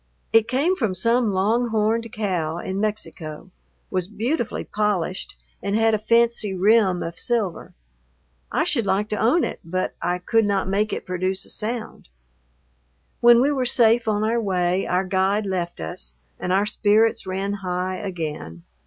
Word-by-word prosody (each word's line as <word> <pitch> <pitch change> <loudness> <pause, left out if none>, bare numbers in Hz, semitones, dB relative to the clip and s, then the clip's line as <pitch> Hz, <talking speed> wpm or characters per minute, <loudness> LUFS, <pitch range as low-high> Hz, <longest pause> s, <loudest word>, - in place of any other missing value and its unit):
It 225 -1 +5
came 285 +10 +1
from 220 - -1
some 230 +4 +2
long 215 +6 +1
horned 225 +1 0
cow 180 -7 -2
in 190 +2 -4
Mexico, 185 -6 -4 0.4
was 185 -2 -1
beautifully 230 +5 -2
polished, 200 -4 -2 0.2
and 200 +1 -1
had 225 0 +3
a 215 - +2
fancy 230 -2 +2
rim 195 -1 +3
of 165 0 -6
silver. 225 -7 -2 0.8
I - - +1
should 285 - 0
like 205 +3 +1
to 210 - -2
own 275 +10 +3
it, - - -3
but 185 +3 -2
I 175 +1 0
could 225 +5 +1
not 200 -2 0
make 205 +3 0
it - - -4
produce 185 +1 -1
a - - -3
sound. 220 - -5 1.1
When 240 0 +7
we 285 - +2
were 260 -3 0
safe 230 -1 +4
on 210 -1 +1
our 230 +2 +1
way 185 -2 0
our 180 +1 +1
guide 195 +2 +1
left 180 -3 -3
us, 60 -7 -6 0.2
and 180 - -3
our 195 +2 +3
spirits 210 0 +2
ran 195 +2 -2
high 185 0 -2
again. 150 - -5
205 Hz, 160 wpm, -23 LUFS, 185-225 Hz, 1.1 s, When